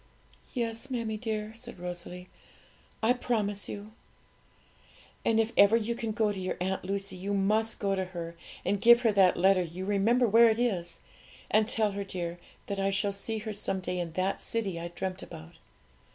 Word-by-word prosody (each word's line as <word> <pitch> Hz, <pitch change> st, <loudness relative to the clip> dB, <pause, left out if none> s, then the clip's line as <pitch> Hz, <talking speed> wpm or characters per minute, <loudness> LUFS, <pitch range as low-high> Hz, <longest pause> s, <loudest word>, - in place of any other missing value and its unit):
'Yes, 230 Hz, +1 st, -2 dB
mammie 230 Hz, -4 st, -2 dB
dear,' 215 Hz, -1 st, -3 dB
said 230 Hz, -4 st, -10 dB
Rosalie, 180 Hz, 0 st, -7 dB, 0.8 s
'I 235 Hz, +3 st, +5 dB
promise 210 Hz, -5 st, -1 dB
you.' 205 Hz, +1 st, -7 dB, 1.3 s
'And 225 Hz, -1 st, +3 dB
if 225 Hz, 0 st, +1 dB
ever 200 Hz, +3 st, +7 dB
you 230 Hz, +1 st, -1 dB
can 230 Hz, -1 st, -3 dB
go 215 Hz, -1 st, +1 dB
to 195 Hz, -, -5 dB
your 185 Hz, 0 st, -3 dB
Aunt 190 Hz, +1 st, -2 dB
Lucy, 195 Hz, +1 st, -2 dB
you 195 Hz, +3 st, -2 dB
must 215 Hz, +3 st, +1 dB
go 200 Hz, -2 st, 0 dB
to 190 Hz, -1 st, -1 dB
her 170 Hz, -2 st, -7 dB, 0.3 s
and 200 Hz, +2 st, 0 dB
give 235 Hz, +1 st, +7 dB
her 230 Hz, -3 st, +3 dB
that 195 Hz, -3 st, +4 dB
letter; 190 Hz, +1 st, +4 dB
you 180 Hz, +2 st, -5 dB
remember 220 Hz, +5 st, +3 dB
where 230 Hz, +2 st, +7 dB
it 220 Hz, -, +1 dB
is; 185 Hz, -8 st, -1 dB, 0.5 s
and 215 Hz, 0 st, +4 dB
tell 220 Hz, -3 st, +2 dB
her, 200 Hz, 0 st, -3 dB
dear, 175 Hz, -3 st, -5 dB, 0.3 s
that 200 Hz, -1 st, -4 dB
I 195 Hz, 0 st, +2 dB
shall 195 Hz, +1 st, 0 dB
see 220 Hz, +3 st, -3 dB
her 215 Hz, -, -3 dB
some 200 Hz, -2 st, 0 dB
day 180 Hz, -1 st, -3 dB
in 170 Hz, -2 st, -4 dB
that 185 Hz, +3 st, -1 dB
city 200 Hz, -7 st, -1 dB
I 170 Hz, -, -4 dB
dreamt 185 Hz, +2 st, -4 dB
about. 165 Hz, 0 st, -11 dB
200 Hz, 185 wpm, -29 LUFS, 185-225 Hz, 1.3 s, ever